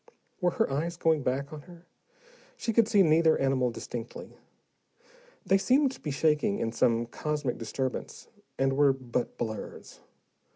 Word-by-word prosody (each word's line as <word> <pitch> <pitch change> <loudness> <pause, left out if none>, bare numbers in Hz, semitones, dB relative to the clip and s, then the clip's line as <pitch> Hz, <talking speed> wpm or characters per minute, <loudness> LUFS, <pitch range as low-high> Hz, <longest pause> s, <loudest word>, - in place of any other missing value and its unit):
Were 180 -3 +2
her - - +3
eyes 165 +5 -2
going 160 -3 +2
back 140 +3 -2
on 150 - -7
her? 175 0 -14 0.7
She 225 - -2
could 230 -1 +4
see 205 -3 +5
neither 160 0 +4
animal 135 -2 +1
distinctly: 115 0 -7 1.1
they 195 - +3
seemed 260 +8 +3
to - - -11
be 150 - -4
shaking 155 +7 +1
in 115 - -2
some 115 0 +2
cosmic 145 +1 -3
disturbance, 130 +3 -4 0.3
and 135 0 +2
were 140 0 +4
but 125 -2 -4
blurs. 110 -2 -6
145 Hz, 150 wpm, -28 LUFS, 125-170 Hz, 1.1 s, see